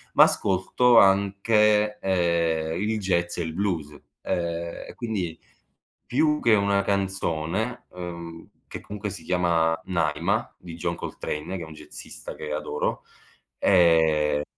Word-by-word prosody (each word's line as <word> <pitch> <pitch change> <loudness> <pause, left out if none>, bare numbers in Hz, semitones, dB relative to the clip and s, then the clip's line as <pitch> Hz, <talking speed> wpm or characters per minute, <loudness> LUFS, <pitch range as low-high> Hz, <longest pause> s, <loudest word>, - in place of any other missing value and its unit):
ma - - +9
ascolto 110 +6 +2
anche, 105 +2 +3
ehm, 85 -3 0
il 110 +1 0
jazz 85 -3 0
e 85 - -1
il 80 -1 -5
blues, 85 -6 -2 0.3
ehm, 85 -1 -3
e, - - -9
quindi, 100 -9 -3 0.7
più 150 +4 +2
che 115 -2 +5
una 100 -1 +2
canzone, 95 +3 -2
ehm, 85 -2 -8 0.2
che, - - -8
comunque, 105 0 -6
si 85 - -7
chiama 85 -2 +1
“Naima”, 85 -5 -1
di 85 -2 -10
John 85 - -2
Coltrane, 75 +5 -5
che - - -7
è - - -6
un 80 - -10
jazzista - - -9
che 75 -1 -6
adoro, 75 - -2 0.6
ehm 80 -5 +4
90 Hz, 130 wpm, -25 LUFS, 80-100 Hz, 0.7 s, ma